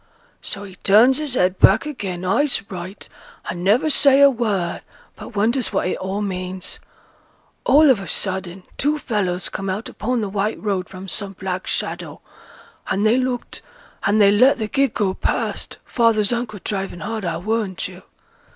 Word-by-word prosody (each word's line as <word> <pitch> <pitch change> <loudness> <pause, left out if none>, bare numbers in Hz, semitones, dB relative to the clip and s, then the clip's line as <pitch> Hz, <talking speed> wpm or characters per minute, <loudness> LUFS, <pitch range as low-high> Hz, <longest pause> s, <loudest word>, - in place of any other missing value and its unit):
So 205 - -1
he 190 -2 -11
turns 230 +9 +5
his 295 -4 -2
head 185 -3 +1
back - - +6
again, 190 -11 -5
eyes 275 +9 +2
right, 185 +2 -7 0.4
and 175 0 -4
never 215 +10 +3
say 280 -2 +5
a 280 0 +8
word, 210 -8 -1 0.3
but - - -11
wonders 230 +5 +1
what 195 - 0
it - - -1
all 195 +2 -3
means. 185 -1 -4 0.9
All 295 +4 +6
of 240 - +2
a 195 - -7
sudden 190 -1 -2 0.2
two 295 +2 +2
fellows 190 -9 -1
come 195 0 -4
out 195 +4 -4
upo' 250 +4 -2
th' 210 -5 -2
white 210 +2 -1
road 195 -4 -2
from 190 0 -9
some 200 0 -4
black 185 0 -4
shadow, - - -3 0.7
and 200 +2 0
they 220 +3 +4
looked, 255 -1 -3 0.4
and 205 +2 +2
they 200 -1 +6
let 255 +7 +5
th' 215 -3 -4
gig 275 -4 +1
go 195 -4 +1
past, - - -2
father's 230 -2 +2
uncle 235 -3 -3
driving 195 -4 -3
hard, 220 +5 -4
I'll 170 -1 -3
warrant 215 -3 -1
him. 185 0 -5
205 Hz, 170 wpm, -21 LUFS, 190-240 Hz, 0.9 s, a